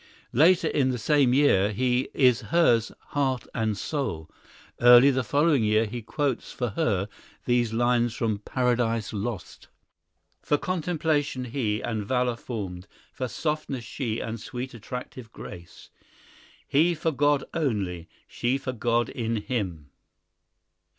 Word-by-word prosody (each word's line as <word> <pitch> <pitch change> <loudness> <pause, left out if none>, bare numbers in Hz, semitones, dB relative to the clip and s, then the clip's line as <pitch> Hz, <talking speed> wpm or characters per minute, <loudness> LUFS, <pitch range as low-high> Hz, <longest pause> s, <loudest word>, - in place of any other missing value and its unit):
Later 165 +8 +5
in 135 -3 +1
the 125 - -1
same 140 +2 +3
year 115 -8 +4
he 125 +4 0
is 125 -3 +4
hers 120 -10 +3 0.2
"heart 135 -4 0
and 110 -2 -1
soul." 100 - -3 0.5
Early 120 +3 +8
the 130 -1 0
following 145 +2 +2
year 110 +1 +3
he 120 +3 -5
quotes 140 +2 -2
for 125 -2 -2
her 100 - 0 0.4
these 120 -2 +2
lines 120 0 +1
from 110 -3 -1
"Paradise 115 -2 0
Lost:" 105 -1 -5 0.7
"For 145 - +1
contemplation 155 -6 -1
he, 115 -4 -2
and 110 -3 -2
valour 125 +2 0
formed, 95 -7 -6 0.3
For 130 - -3
softness 150 -1 -3
she, 115 -1 -3
and 115 0 -4
sweet 125 +4 -6
attractive 120 0 -8
grace; 85 -5 -11 0.8
He 165 +5 +3
for 160 +1 -1
God 145 -1 +2
only, 100 - -2 0.2
she 125 +3 -1
for 130 -1 -4
God 120 0 +1
in 115 -1 -3
him!" 95 - -4
120 Hz, 130 wpm, -26 LUFS, 110-140 Hz, 0.8 s, Early